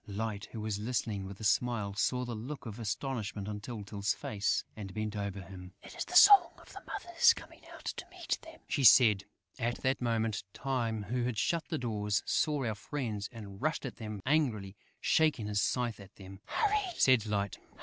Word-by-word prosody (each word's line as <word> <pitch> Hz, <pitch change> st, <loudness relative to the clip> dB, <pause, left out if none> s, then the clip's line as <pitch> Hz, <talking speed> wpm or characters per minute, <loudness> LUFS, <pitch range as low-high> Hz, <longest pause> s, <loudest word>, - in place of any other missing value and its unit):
Light, 105 Hz, 0 st, -3 dB
who 110 Hz, -, -6 dB
was 105 Hz, -1 st, -2 dB
listening 110 Hz, -3 st, -2 dB
with 95 Hz, 0 st, -9 dB
a -, -, -8 dB
smile, 105 Hz, -1 st, +1 dB
saw 125 Hz, +5 st, 0 dB
the 120 Hz, -, -4 dB
look 125 Hz, +6 st, -6 dB
of 110 Hz, 0 st, -7 dB
astonishment 110 Hz, -3 st, -3 dB
on 105 Hz, -1 st, -4 dB
Tyltyl's 105 Hz, -2 st, -3 dB
face 105 Hz, -1 st, -1 dB
and 100 Hz, -2 st, -8 dB
bent 110 Hz, 0 st, -3 dB
over 100 Hz, -1 st, -3 dB
him: 90 Hz, 0 st, -11 dB
"It -, -, -11 dB
is -, -, -3 dB
the 360 Hz, -, -7 dB
song 395 Hz, -2 st, +9 dB
of -, -, -15 dB
the -, -, -9 dB
mothers 460 Hz, +7 st, +3 dB
coming -, -, -12 dB
out -, -, -12 dB
to 365 Hz, -, -7 dB
meet 355 Hz, -2 st, -3 dB
them," 325 Hz, 0 st, -13 dB
she 140 Hz, -, 0 dB
said. 105 Hz, -5 st, +7 dB, 0.3 s
At 120 Hz, 0 st, 0 dB
that 130 Hz, 0 st, +1 dB
moment, 115 Hz, -3 st, 0 dB
Time, 115 Hz, -5 st, -1 dB
who 120 Hz, +4 st, -1 dB
had 120 Hz, -3 st, -2 dB
shut 165 Hz, +11 st, 0 dB
the 160 Hz, -, -2 dB
doors, 105 Hz, -4 st, -1 dB
saw 150 Hz, -4 st, +1 dB
our 110 Hz, -, 0 dB
friends 105 Hz, -3 st, -4 dB
and 100 Hz, -5 st, -10 dB
rushed 155 Hz, 0 st, 0 dB
at 125 Hz, -, -6 dB
them 105 Hz, -3 st, -6 dB
angrily, 120 Hz, -10 st, +1 dB, 0.2 s
shaking 150 Hz, -8 st, +2 dB
his 105 Hz, -1 st, 0 dB
scythe 120 Hz, -4 st, 0 dB
at 100 Hz, 0 st, -13 dB
them. 95 Hz, -1 st, -11 dB
"Hurry!" 415 Hz, -4 st, 0 dB
said 125 Hz, -5 st, +4 dB
Light. 100 Hz, -2 st, -1 dB
110 Hz, 195 wpm, -32 LUFS, 105-130 Hz, 0.3 s, song